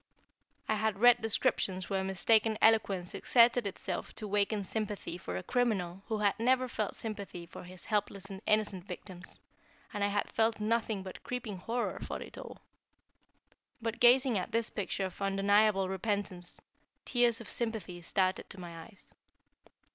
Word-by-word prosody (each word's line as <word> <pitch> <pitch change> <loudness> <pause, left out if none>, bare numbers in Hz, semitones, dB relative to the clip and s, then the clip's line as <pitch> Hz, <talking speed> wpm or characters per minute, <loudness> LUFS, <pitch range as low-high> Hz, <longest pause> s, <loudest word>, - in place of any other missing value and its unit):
I - - +2
had 215 -1 0
read 245 +1 +7
descriptions 210 -4 +1
where 195 -1 0
mistaken 215 +3 +3
eloquence 200 -5 +3
exerted 235 -2 +4
itself 195 - -4
to 215 - -5
waken 205 +1 +1
sympathy 210 -2 -3
for 90 - -5
a 90 - -5
criminal 195 -7 0
who 220 -1 -1
had 205 0 +1
never 255 +2 +3
felt 215 -4 -3
sympathy 200 -5 -6
for 170 - -10
his 180 0 -10
helpless 205 -2 -1
and 195 -1 -8
innocent 210 -4 +2
victims, 185 -1 -5 0.5
and 205 - -1
I - - +4
had 205 0 -1
felt 225 0 +2
nothing 220 -2 0
but 185 - -8
creeping 245 -5 -4
horror 235 +5 -2
for - - -5
it - - -9
all. - - -9 1.2
But 225 0 -3
gazing 245 -2 +5
at 180 - -5
this 230 0 0
picture 195 -1 -2
of 185 +1 -8
undeniable 195 0 +3
repentance, 190 -2 -2 0.5
tears 240 -2 +3
of 230 - -9
sympathy 220 -7 -3
started 185 +2 0
to 195 - -9
my 170 -2 -8
eyes. 210 -4 -15
205 Hz, 155 wpm, -32 LUFS, 190-225 Hz, 1.2 s, read